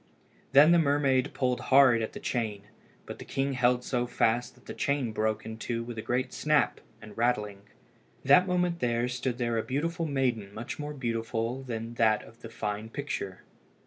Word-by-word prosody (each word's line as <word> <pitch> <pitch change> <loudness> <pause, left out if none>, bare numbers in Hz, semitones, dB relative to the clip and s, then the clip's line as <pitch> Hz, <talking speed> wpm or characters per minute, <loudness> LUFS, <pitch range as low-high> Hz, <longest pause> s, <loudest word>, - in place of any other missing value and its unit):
Then 145 +4 +8
the 170 - +6
mermaid 140 -3 +2
pulled 125 -2 0
hard 130 -3 +6
at 110 - -4
the - - -7
chain, 110 -5 -2 0.4
but - - -8
the - - -7
king 135 0 -2
held 125 -1 +2
so 125 -1 -1
fast 120 0 0
that 125 - -23
the - - -7
chain 140 -5 -1
broke 110 0 -1
in 110 0 -6
two 115 0 -3
with 120 0 -7
a 110 - -4
great 125 +3 -2
snap 150 -2 +1 0.2
and 105 -1 -12
rattling. 105 -4 0 0.6
That 145 +7 +6
moment 180 -1 0
there 120 -2 0
stood 125 0 -3
there 120 -2 0
a - - -2
beautiful 165 +5 -2
maiden 125 -8 -1
much 120 +6 -6
more 150 0 -5
beautiful 115 0 -2
than 115 -2 -5
that 110 -1 +3
in - - -13
the 115 - -9
fine 105 -1 -4
picture. 115 -8 -5
125 Hz, 185 wpm, -29 LUFS, 115-140 Hz, 0.6 s, Then